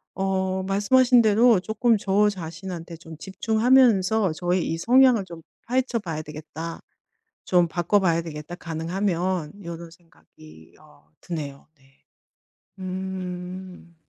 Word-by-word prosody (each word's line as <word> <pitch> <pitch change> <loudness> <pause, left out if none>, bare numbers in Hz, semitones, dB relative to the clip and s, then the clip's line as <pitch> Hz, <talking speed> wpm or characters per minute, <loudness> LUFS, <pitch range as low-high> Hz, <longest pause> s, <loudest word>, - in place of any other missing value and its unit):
어 190 0 -1
말씀하신 240 +6 +4
대로 220 0 +5
'쪼끔 220 +2 +1
저 205 +1 +2
자신한테 170 -2 -7
좀 165 -1 -11
집중하면서 220 -1 +3
저의 175 +1 -1
이 165 - -2
성향을 245 +1 +4
좀 170 -2 -11 0.3
파헤쳐 250 -1 0
봐야 165 -6 -5
되겠다. 155 +2 -8 0.6
좀 175 -1 +3
바꿔봐야 175 0 +1
되겠다 155 +1 -8
가능하면.' 175 +1 -3
요런 170 0 -7
생각이 80 - -19
어 75 - -22
드네요. 145 -5 -6
네. 135 +1 -28 0.8
음. 185 -1 -6
185 Hz, 245 characters per minute, -24 LUFS, 165-205 Hz, 0.8 s, 대로